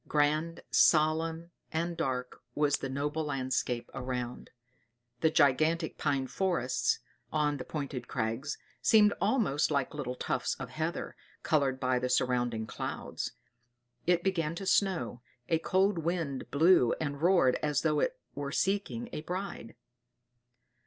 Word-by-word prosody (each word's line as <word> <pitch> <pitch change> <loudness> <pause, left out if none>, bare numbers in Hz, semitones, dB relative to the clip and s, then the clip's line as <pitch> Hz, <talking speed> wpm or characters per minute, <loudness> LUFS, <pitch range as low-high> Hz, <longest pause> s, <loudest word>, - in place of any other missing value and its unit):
Grand, 155 +3 +1
solemn, 160 +2 +3 0.2
and 170 +1 -1
dark 125 -4 -3
was 145 -1 +2
the 135 - -5
whole 150 +3 -1
landscape 130 -4 -1
around. 125 -1 -4 0.7
The 160 - +4
gigantic 155 +3 +2
pine 140 -2 +1
forests, 130 -8 0 0.3
on 150 -1 +1
the 130 - -5
pointed 140 -4 -5
crags, 115 +7 -2 0.2
seemed 210 -2 +6
almost 200 - +2
like 140 -3 0
little 135 -4 -4
tufts - - -1
of - - -7
heather, - - -3 0.3
colored 135 -4 +2
by 130 -1 +1
the 125 0 -1
surrounding 120 -3 +1
clouds. - - -5 0.7
It 175 -1 +3
began 165 -4 0
to 195 - -5
snow, 170 - +1 0.3
a 165 - +3
cold 190 +2 +2
wind 165 -5 -2
blew 155 -4 +5
and 145 -2 -3
roared 170 -7 +4
as 150 -2 +1
though 150 -2 +2
it - - 0 0.2
were 140 -1 -4
seeking 205 +7 0
a - - -3
bride. 180 - -5
150 Hz, 130 wpm, -31 LUFS, 130-170 Hz, 0.7 s, seemed